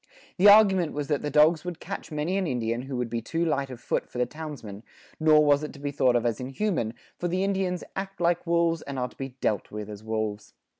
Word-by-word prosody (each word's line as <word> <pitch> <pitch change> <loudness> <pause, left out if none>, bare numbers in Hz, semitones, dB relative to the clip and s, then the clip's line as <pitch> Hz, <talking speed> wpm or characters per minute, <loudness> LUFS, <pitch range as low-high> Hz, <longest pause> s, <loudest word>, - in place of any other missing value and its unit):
The 200 +3 +7
argument 195 -5 +6
was 145 0 -4
that 145 -2 +1
the 150 - -2
dogs 155 +2 +4
would 180 -2 -5
catch - - -7
many 155 +5 -1
an 195 -2 0
Indian 120 -3 -1
who 135 0 -5
would 125 -1 -1
be 115 0 -3
too 165 +6 -1
light 140 -4 0
of 125 -2 -8
foot - - -2
for - - -9
the 125 - +2
townsmen, 135 -8 -8 0.4
nor 155 -1 +5
was 145 0 +4
it 150 - -6
to 140 - -12
be 145 0 -3
thought 130 -3 +2
of 120 0 +1
as 115 -2 0
inhuman; 130 - -2 0.2
for 175 - -1
the 185 +2 0
Indians 190 -2 -1
"act 195 -1 -5
like 175 0 +1
wolves 170 -1 +2
and 140 -1 -6
are 125 0 -1
to - - -21
be 135 -2 -7
dealt 105 - 0
with 105 0 -6
as 105 0 -9
wolves." 110 -1 -3
150 Hz, 245 wpm, -27 LUFS, 125-170 Hz, 0.4 s, The